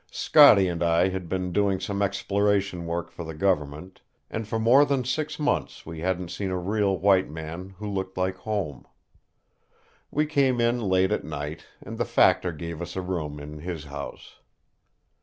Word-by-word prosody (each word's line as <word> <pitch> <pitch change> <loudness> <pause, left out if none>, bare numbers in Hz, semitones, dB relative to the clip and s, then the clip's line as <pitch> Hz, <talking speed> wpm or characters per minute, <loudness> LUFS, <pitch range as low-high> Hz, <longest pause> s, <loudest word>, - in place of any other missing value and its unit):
Scotty 145 -11 +6
and 85 -1 -3
I 85 +2 +3
had 95 -2 -5
been 90 -1 -2
doing 100 0 +1
some 100 +1 -3
exploration 100 -2 0
work 85 0 -3
for 85 - -7
the 80 -1 -7
government, 85 -1 -1 0.3
and 110 -1 -4
for 115 - -2
more 120 +6 +6
than 140 -3 0
six 150 +4 -2
months 150 -1 -1
we 80 -1 -7
hadn't 90 0 -2
seen 100 -2 -3
a 90 - -1
real 100 +1 0
white 95 +1 +3
man 80 +5 -7
who 105 +2 -6
looked 95 -2 -4
like 95 0 -1
home. 95 -8 -4 1.2
We 150 +1 +1
came 140 -5 +2
in 120 +1 +2
late 95 -1 +2
at 105 - 0
night, 75 +1 -6 0.2
and - - -8
the - - +1
factor 90 - +3
gave 85 +1 -6
us 85 0 -6
a 95 - -2
room 80 -5 -4
in 75 +1 -9
his 85 -1 -5
house. 70 -1 -9
95 Hz, 175 wpm, -26 LUFS, 85-105 Hz, 1.2 s, Scotty